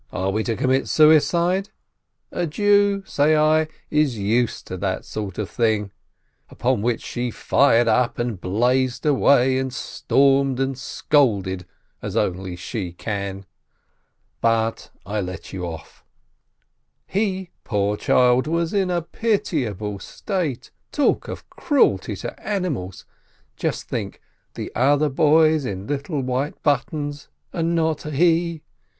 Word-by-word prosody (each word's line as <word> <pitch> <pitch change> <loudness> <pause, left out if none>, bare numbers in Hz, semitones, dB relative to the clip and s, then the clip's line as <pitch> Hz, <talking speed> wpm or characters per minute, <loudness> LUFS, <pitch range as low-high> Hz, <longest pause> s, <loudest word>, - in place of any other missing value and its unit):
Are 95 +1 -1
we 110 +2 0
to 115 - -1
commit 130 +3 +1
suicide? 170 +5 +4 0.6
A 175 - -1
Jew," 200 +3 +3
say 150 -1 +2
I, 155 +1 +3 0.2
"is 150 -6 +2
used 110 +4 0
to 95 - -6
that 95 0 -2
sort 100 -3 -5
of 105 - -2
thing," 110 -4 0 0.6
upon - - 0
which 120 +1 -1
she 120 0 -3
fired 120 -1 +3
up 125 +1 +2
and 120 -6 -3
blazed 125 +6 +1
away 135 -2 +4
and 130 0 -2
stormed 135 0 +1
and 135 0 0
scolded 100 - 0 0.3
as - - -5
only 90 0 -1
she 90 0 -5
can. 100 0 -4 1.0
But 115 -1 0 0.2
I 105 +2 -2
let 90 -1 -7
you 90 -2 -4
off! 80 -1 -10 1.0
He, 190 -3 -2
poor 105 -2 0
child, 125 +4 +3
was 165 +2 0
in 195 -2 +1
a 175 -2 0
pitiable 145 - -2
state. 150 - -4 0.2
Talk 290 - +1
of - - -7
cruelty 290 -5 +1
to - - -7
animals! 155 - -3 0.5
Just - - -3
think: - - -4 0.4
the - - -5
other 145 +4 +3
boys 155 +1 +4
in 95 -5 -4
little 145 - -2
white 130 +3 -2
buttons, 145 +1 -1 0.2
and 170 0 0
not 160 -2 0
he 165 +2 +1
135 Hz, 130 wpm, -22 LUFS, 110-155 Hz, 1.0 s, suicide